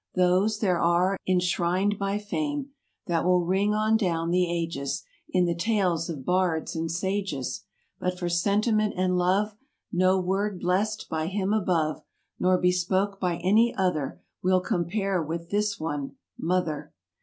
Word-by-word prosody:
Those, 185 +4 +3
there 185 -5 +1
are, 180 +3 +2
enshrined 185 +2 +1
by 200 0 0
fame 285 +6 -3 0.3
That 170 -2 0
will 180 0 +3
ring 195 +4 +2
on 215 +1 +3
down 170 -5 0
the 180 0 +2
ages 165 -5 -2 0.3
In 180 -1 +2
the 170 - +1
tales 180 -3 0
of 145 -6 -6
bards 180 -4 0
and 165 0 -2
sages; 185 -5 -2 0.3
But 180 0 -2
for 180 -1 -2
sentiment 210 +5 +1
and 185 0 +1
love 195 +4 +1 0.4
No'word 185 +2 +1
blest 200 +5 0
by 160 0 -2
Him 195 +2 -1
above. 170 -7 +1 0.4
Nor 185 0 +3
bespake 185 +2 +1
by 180 -3 0
any 220 +6 +4
other. 180 -8 -1 0.2
Will 185 0 +3
compare 190 0 -1
with 165 +2 -5
this 205 0 0
one,—"Mother." 160 +2 -3
185 Hz, 140 wpm, -26 LUFS, 170-200 Hz, 0.4 s, any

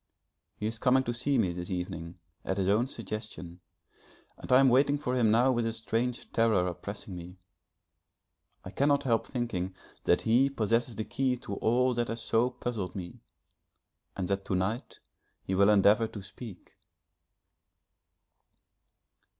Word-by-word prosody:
He 105 - -5
is 110 +1 -3
coming 130 0 +4
to 120 - -2
see 130 +4 +1
me 95 -7 +1
this 90 0 -6
evening, 90 -2 -5 0.3
at 95 - -2
his 95 -1 0
own 110 +6 +3
suggestion, 105 -7 -7 0.8
and - - -9
I 125 - +8
am 135 - +6
waiting 140 +3 +4
for 145 -3 -3
him 120 -4 +3
now 120 +4 +4
with 120 -2 +1
a 115 - 0
strange 115 +2 -2
terror 110 -5 +3
oppressing 95 +2 -6
me. 90 +1 -9 1.3
I 95 - -7
cannot 140 +3 +2
help 115 -4 +1
thinking 95 -8 -3 0.3
that 90 - +3
he 120 +5 +4
possesses 115 -2 0
the 110 +1 -3
key 130 -1 0
to 100 - -6
all 125 +3 +2
that 120 0 -1
has 115 0 -3
so 115 +2 +2
puzzled 110 -7 -4
me, 90 -4 -7 1.0
and 95 -2 -2
that 100 +1 -1
to 95 - -1
night 105 +8 -3 0.4
he 95 - -3
will 100 +2 +5
endeavour 105 +2 +5
to 105 -3 -9
speak. 100 +1 -11
110 Hz, 155 wpm, -29 LUFS, 95-125 Hz, 1.3 s, I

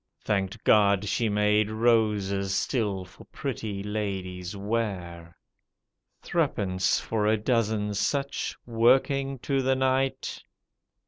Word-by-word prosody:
Thanked 100 +1 -1
God 100 -1 +4
she 115 +2 0
made 105 0 +2
roses 105 -4 +1
still 100 -7 -1
for 90 +1 -16
pretty 110 -8 -5
ladies' 95 -3 -4
wear. 95 -6 -4 0.9
Threepence 95 -2 0
for 105 -2 -1
a 110 +1 +3
dozen 105 -2 0
such, 140 +7 -1
working 135 +4 +2
to 135 -1 +1
the 130 0 +2
night. 130 0 0
105 Hz, 105 wpm, -27 LUFS, 100-120 Hz, 0.9 s, God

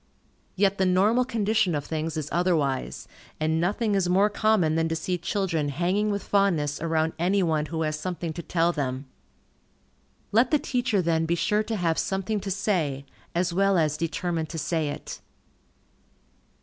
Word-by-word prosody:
Yet 195 0 +2
the 190 - +3
normal 205 +7 +3
condition 215 -6 +1
of 145 -1 -3
things 160 0 -3
is 150 -2 -3
otherwise, 155 -6 0 0.3
and 160 +1 +1
nothing 210 +4 0
is 190 -3 +1
more 195 +3 +3
common 205 -7 +2
than 165 0 +1
to 165 - -1
see 170 +3 -2
children 170 -5 -1
hanging 180 +8 0
with 200 -2 -2
fondness 165 -8 +1
around 160 0 0
any 190 +3 +2
one 155 -3 0
who 160 -1 -2
has 155 -1 -2
something 170 -1 -4
to 170 - -5
tell 170 0 +1
them. 135 -4 -3 1.3
Let 230 +4 +4
the 300 - +4
teacher 245 -8 0
then 165 -1 +1
be 170 - +1
sure 210 +4 +1
to 220 +1 -3
have 170 -5 0
something 195 +2 -1
to 195 0 -5
say, 170 -9 -1 0.3
as 175 0 +1
well 195 +1 +3
as 155 -3 +2
determined 165 0 -2
to 165 - -6
say 160 -1 -1
it. 145 - -7
175 Hz, 170 wpm, -26 LUFS, 160-200 Hz, 1.3 s, Let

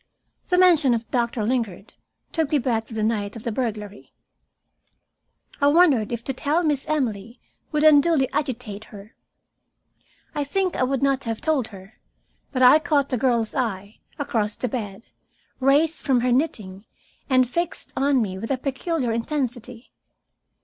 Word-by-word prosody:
The 360 - +2
mention 330 -9 +5
of 230 0 -5
Doctor 235 -2 0
Lingard 220 -5 -2 0.4
took 320 -4 0
me 300 - +2
back 235 -4 -1
to 225 - -11
the 215 - -1
night 210 -1 -1
of 225 - -9
the 235 - -2
burglary. 210 -4 -5 1.5
I 285 - +5
wondered 290 - +4
if 235 -1 -4
to 270 - -3
tell 305 +6 0
Miss 295 -2 0
Emily 235 -6 -2 0.3
would 300 -1 0
unduly 305 -2 +5
agitate 240 -7 -3
her. 205 +1 -13 1.2
I 295 - -1
think 370 +6 -1
I - - -2
would 265 +1 0
not 275 -1 +1
have 225 -1 -3
told 295 -7 0
her, 195 0 -14 0.5
but 260 -2 +1
I 255 +5 +8
caught 290 -3 +1
the 255 - 0
girl's 235 -4 +1
eye, 205 -5 -3 0.2
across 220 -7 -2
the 250 - -2
bed, 210 -3 -5 0.6
raised 290 +4 +2
from 255 -3 +2
her 250 0 +1
knitting 215 -8 -1 0.4
and 255 -1 +4
fixed 340 +7 -4
on 275 -2 +2
me 190 -2 -5
with 225 - -6
a 270 - 0
peculiar 270 0 -2
intensity. 245 -1 -4
250 Hz, 155 wpm, -23 LUFS, 225-285 Hz, 1.5 s, I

